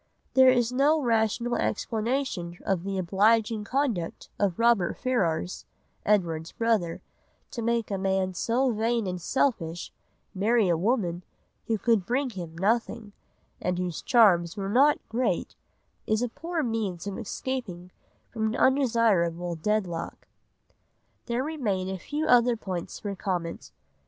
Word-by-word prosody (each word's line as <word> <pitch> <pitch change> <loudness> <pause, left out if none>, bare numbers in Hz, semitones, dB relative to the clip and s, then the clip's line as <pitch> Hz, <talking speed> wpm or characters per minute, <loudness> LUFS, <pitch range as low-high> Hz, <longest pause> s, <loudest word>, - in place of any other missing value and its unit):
There 260 -1 +7
is 245 -2 +3
no 285 +5 +3
rational 235 -1 +1
explanation 225 -7 -2
of 190 -3 0
the 195 0 -3
obliging 210 +4 +2
conduct 240 -10 -2
of 195 -4 +1
Robert 230 -6 +2
Ferrars, 185 -9 -1 0.4
Edward's 165 -6 +1
brother; 220 -8 0 0.5
to 235 - -5
make 230 -1 0
a 195 - -1
man 190 -1 0
so 245 +7 +1
vain 230 0 0
and 180 -1 -4
selfish 175 -8 -1 0.4
marry 215 +2 +2
a 170 - +3
woman 180 -2 0 0.4
who 225 - +1
could 225 -2 +2
bring 255 +6 -1
him 170 -5 -8
nothing, 220 +2 -1 0.5
and 180 0 -1
whose 180 -3 -3
charms 195 -8 +4
were 195 -1 -3
not 275 +7 +5
great, 245 +3 -1 0.5
is 215 +2 +1
a 245 - -1
poor 330 +5 -3
means 215 -7 -2
of 200 +1 -4
escaping 215 -6 -5 0.4
from 220 -2 -1
an 220 - -2
undesirable 220 -11 +2
deadlock. 175 -1 -2 1.0
There 240 +1 0
remain 215 -12 -2
a 190 -1 -4
few 295 - -3
other 245 -1 +4
points 185 -5 -5
for 200 -1 -5
comment. 175 -4 -4
215 Hz, 135 wpm, -27 LUFS, 180-240 Hz, 1.0 s, There